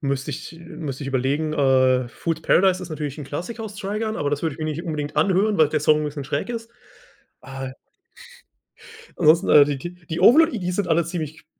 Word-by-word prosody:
Müsste 140 -1 -2
ich 145 - -7
äh, 165 - -14
müsste 150 -5 -7
ich - - -4
überlegen, 140 +4 -1
äh, 130 -3 +3
Fool's 165 +5 -4
Paradise 185 0 +3
ist 175 - -8
natürlich 150 -1 -5
'n 150 - -6
Klassiker 180 - -6
aus 210 -1 -7
Trigun, 215 +2 -3
aber 145 - -1
das 145 +1 -2
würde 160 -4 -1
ich - - -17
mich 155 -1 -3
nicht 170 - -6
unbedingt 150 -2 -4
anhören, 195 +6 +2
weil 155 -4 +4
der 155 - 0
Song 150 +1 +4
'n - - -2
bisschen 145 -2 -5
schräg 145 - -3
ist, 230 -1 -6 0.7
äh. 135 0 -7 1.5
Ansonsten, 165 +2 +4
äh, 145 -1 +8
die 145 -1 -2
die 175 +6 -7
die 170 -2 -7
Overlord 265 - +6
EDs 180 -4 -3
sind 200 -2 -1
alle 165 0 +2
ziemlich 160 -3 -6
155 Hz, 210 wpm, -22 LUFS, 145-180 Hz, 1.5 s, äh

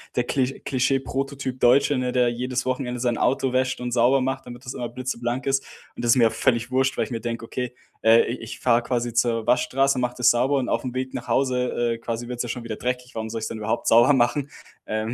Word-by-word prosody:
der 125 - +2
Kli 130 +1 -1
Klischee-Prototyp-Deutsche, 135 0 +1
ne, 125 -1 -1
der 125 -1 +3
jedes 125 +1 -3
Wochenende 125 -1 -2
sein 120 -2 0
Auto 130 0 +1
wäscht 130 0 0
und 125 0 -3
sauber 125 +3 +3
macht, 130 +1 -2
damit 120 0 -10
das 125 - -5
immer 120 - -3
blitzeblank 120 +1 -3
ist. 135 0 +1 0.3
Und - - -3
das 120 - +4
ist - - +1
mir 115 -3 +5
völlig 120 -1 0
wurscht, 130 +1 +1
weil - - +2
ich - - -7
mir 115 - -2
denke: 115 0 -4
„Okay, 125 +1 -5 0.3
äh 115 +1 +6
ich 120 - -4
ich 115 - -8
fahre 120 -1 +3
quasi 120 -1 -2
zur 115 -1 +1
Waschstraße, 135 +2 +2
mache 125 0 -1
das 125 - +5
sauber 125 +4 +2
und 130 -2 -1
aufm 125 -2 -1
Weg 130 0 -3
nach - - -6
Hause, 125 -3 +1
äh, - - -9
quasi 115 +1 -5
wird's 125 0 -3
ja 120 - -6
schon 120 +1 -4
wieder 110 -2 -5
dreckig. 125 0 -3
Warum 110 0 -4
soll 115 +1 -4
ich's 110 - -3
denn - - -6
überhaupt 110 0 -2
sauber 120 +5 +6
machen?" 135 +2 +1 0.4
Ähm, 110 +2 -2
125 Hz, 235 wpm, -24 LUFS, 120-130 Hz, 0.4 s, äh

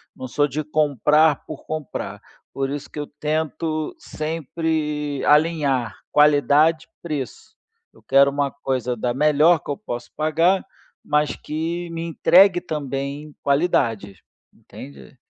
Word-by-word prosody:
não 130 - -7
sou 145 +3 +1
de 150 +3 -3
comprar 150 0 +2
por 155 - -9
comprar, 155 -2 -5 0.3
por 135 0 -2
isso 145 0 -5
que - - -7
eu 145 - -4
tento 155 0 -2
sempre 155 -2 -3
alinhar 150 -6 +2 0.2
qualidade 150 +2 +4
e - - -50
preço, 150 -6 -6 0.4
eu - - -23
quero 140 +1 +5
uma 140 -1 -1
coisa 130 -3 -2
da 120 +2 -2
melhor 150 +2 +4
que - - -5
eu - - -3
posso 120 - -7
pagar, 165 +5 +2 0.4
mas 150 0 +1
que 165 +3 -4
me 165 0 -5
entregue 175 +2 +5
também 145 -1 -5
qualidade, 125 - 0 0.4
entende. 70 -2 -13
150 Hz, 130 wpm, -22 LUFS, 140-160 Hz, 0.4 s, quero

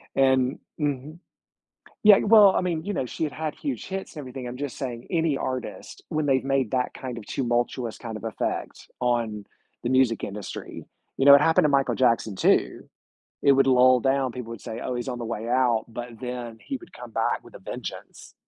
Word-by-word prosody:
And 130 -1 +3 0.2
mhm. 145 +2 -3 0.8
Yeah, 210 -2 +8
well, 210 -2 +7
I - - +2
mean, 170 -3 -2
you 205 - -2
know, 130 - -2
she 160 - -4
had 150 - -2
had 155 -1 -4
huge 285 -3 -4
hits 190 0 -5
and 155 - -8
everything. 130 -2 -7
I'm 125 +1 -6
just 140 -2 -5
saying 120 -3 -5
any 160 -4 +1
artist 125 -8 -5
when 155 -3 -1
they've 135 -1 +2
made 135 -3 +1
that 125 +1 -1
kind 125 -2 -6
of 110 - -8
tumultuous 120 -1 -1
kind 115 -2 -7
of 110 - -8
effect 110 -1 -4
on 115 -4 0 0.4
the 120 - -1
music 130 -3 +2
industry, 100 -1 -6 0.3
you 135 - +1
know, 140 - +10
it 140 - +8
happened 160 0 +4
to 150 - +4
Michael 140 -1 +2
Jackson 115 -5 +2
too. - - +1 0.6
It 140 - +6
would 135 0 +4
lull 130 -1 +5
down. 135 0 +1
People 125 -2 -7
would 115 -4 -8
say, 110 +1 -6
"Oh, 125 - -3
he's 120 +2 -4
on 125 -1 -3
the 120 - -5
way 115 -1 -4
out," 125 -3 +2
but 120 0 -8
then 125 -2 -6
he 270 - -4
would 350 - -16
come - - -10
back - - -1
with - - -16
a - - -9
vengeance. - - -8
130 Hz, 210 wpm, -25 LUFS, 120-145 Hz, 0.8 s, know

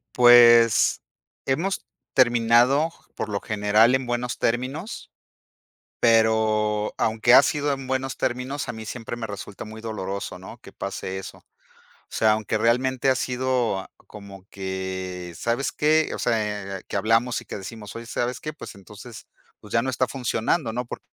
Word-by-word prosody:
Pues, 120 -2 +6 0.4
hemos 165 +9 -1 0.3
terminado, 120 +4 +4 0.3
por 110 - -4
lo 100 -1 -2
general 105 +4 +3
en 130 -1 -2
buenos 120 0 -2
términos. 130 - -3 0.9
Pero 110 -2 +2
aunque 115 +2 +3
ha 135 - +9
sido 145 0 0
en 135 -1 -5
buenos 130 0 -2
términos, 130 +3 -3
a - - -2
mí 110 -1 -8
siempre 115 +1 -6
me 115 -1 -5
resulta 100 -1 -8
muy 110 +1 -10
doloroso, 100 -4 -5
¿no? 95 +6 -11
Que 100 - -14
pase 95 -1 -5
eso. 95 - -9
O - - -27 0.6
sea, 110 -1 +2
aunque 110 0 -1
realmente 125 +4 +1
ha 130 - +2
sido 125 -6 -1 0.2
como 100 -2 -12
que, 95 -2 -5
¿sabes 120 +8 -1
qué? 155 +1 +2
O - - -5
sea, 105 -4 -2
que - - -4
hablamos 115 +4 +1
y - - -14
que - - -6
decimos: 105 +2 -9
"Oye, 115 0 -8
¿sabes 120 +1 -2
qué? 155 - -5
Pues 155 - -10
entonces, 105 +4 -12 0.3
pues 105 - -14
ya 115 - +3
no 130 - -1
está 130 0 0
funcionando, 125 +1 -1
¿no? 125 +2 -3
Porque 120 - -9
115 Hz, 160 wpm, -24 LUFS, 105-125 Hz, 0.9 s, ha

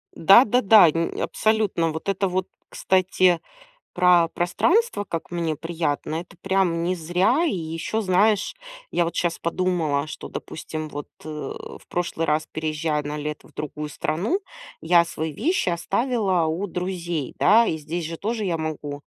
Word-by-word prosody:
Да-да-да, 215 0 +7
ни 165 +2 -2
абсолютно. 215 -7 +1
Вот 160 +5 -5
это 195 0 +1
вот, 185 0 -1 0.2
кстати, 185 -2 +2 0.5
про 180 -2 +4
пространство, 205 - +1
как 165 -4 -5
мне 165 -3 -2
приятно- 160 -1 -2
это 175 +1 -13
прям 190 -3 +1
не 180 +2 +1
зря. 180 - +1
И 320 - 0
еще, 165 +6 -3
знаешь, 205 - +2 0.4
я 175 - +1
вот 170 - -4
щас 170 -1 0
подумала, 165 -4 0
что, 155 - -8
допустим, 155 -1 -6
вот, 145 -1 -7 0.2
э, - - -8
в 150 -1 -7
прошлый 170 -2 -2
раз, 155 +1 +1
переезжая 155 -1 -1
на 145 +1 -5
лето 150 0 -6
в - - -22
другую 150 0 -5
страну, 185 - -1 0.4
я 170 +1 +4
свои 160 -1 -4
вещи 335 - 0
оставила 195 0 0
у 165 +6 -2
друзей, 175 -5 -3
да, 230 +2 +5
и 160 - 0
здесь 160 +3 -4
же 165 +1 -5
тоже 220 +4 -2
я 175 -4 0
могу. 150 -2 -5
170 Hz, 155 wpm, -23 LUFS, 160-190 Hz, 0.5 s, Да-да-да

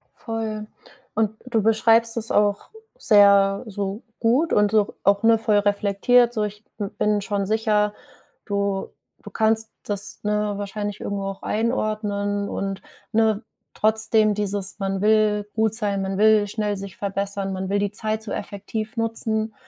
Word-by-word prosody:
Voll. 220 -2 -4 0.5
Und 215 -1 +1
du 235 -3 0
beschreibst 225 +1 +3
es 230 0 -3
auch 205 -1 +1 0.3
sehr 200 - +5
so 200 +1 -4 0.2
gut 255 +9 +2
und 210 -1 +3
so 215 -2 +1
auch, 200 +1 +3
ne, 225 0 +5
voll 215 -2 +2
reflektiert 205 +4 +3
so: 215 -3 -1
„Ich 210 +1 -5
b 205 - -3
bin 210 -1 +1
schon 200 0 -2
sicher.” 210 0 +1 0.5
Du 200 -1 -1 0.3
du - - -9
kannst 220 0 +2
das, 205 0 -3
ne, 210 0 0
wahrscheinlich 205 0 -4
irgendwo 200 -1 -3
auch 195 0 -5
einordnen 210 -3 -1
und, 195 0 -4 0.3
ne, 220 -1 +2 0.3
trotzdem 220 0 +2
dieses: 200 -1 -2
„Man 195 -1 -2
will 210 -1 +2
gut 220 -1 +1
sein, 205 -3 -1
man 190 0 -3
will 215 0 +4
schnell 210 0 -2
sich 195 0 -8
verbessern, 200 0 -2
man 190 0 -4
will 200 +1 +1
die 200 -1 -1
Zeit 215 0 -2
so 215 - -7
effektiv 215 +2 -5
nutzen, 225 -1 0
210 Hz, 155 wpm, -23 LUFS, 200-220 Hz, 0.5 s, sehr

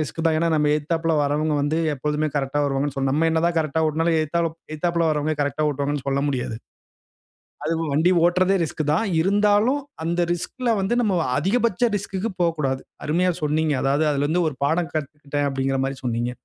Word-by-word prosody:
Risk 155 +2 -3
தான். 160 -1 +2
ஏன்னா 170 +1 +1
நம்ம 150 -1 +2
எதுத்தாப்புல 165 +2 -1
வரவங்க 150 +2 0
வந்து 155 +3 0 0.2
எப்போதுமே 150 +2 -1
கரெக்ட்‌டா 140 +1 0
வருவாங்கன்னு 140 0 -1
சொன் 135 0 0
நம்ம 165 +3 +2
என்ன 160 0 +1
தான் 170 -1 -1
கரெக்ட்‌டா 160 0 0
ஓட்டினாலும் 165 +2 +1
எலுத்தால 165 +2 -1 0.2
எதுத்தாப்புல 170 +1 0 0.3
கரெக்ட்‌டா 145 +2 0
ஓட்டுவாங்கன்னு 145 0 -3
சொல்ல 140 0 0
முடியாது. 125 -4 -3 1.1
அதுவும் 165 0 -1
வண்டி 160 +5 +3
ஓட்டுறதே 185 +2 +3
ரிஸ்க் 155 -1 -3
தான். 165 - +1 0.2
இருந்தாலும் 205 - +3 0.2
அந்த 170 +1 0
ரிஸ்க்‌ல 240 +8 -3
வந்து 195 +4 0
நம்ம 205 -6 +1 0.2
அதிகபட்ச 225 +6 0
ரிஸ்க்‌க்கு 200 +1 -3
போக்கூடாது. 150 -6 0 0.2
அருமையாக 175 +3 +1
சொன்னீங்க! 155 +1 +1
அதாவது 140 +3 +2
அதுல 140 0 0
இருந்து 165 +4 +1
ஒரு 150 - -3
பாடம் 160 +3 +1
கத்துக்கிட்டேன் 145 -1 -3
அப்டிங்கிற 135 0 -1
மாரி 135 0 -3
சொன்னீங்க. 120 0 -1
155 Hz, 170 wpm, -23 LUFS, 145-170 Hz, 1.1 s, வண்டி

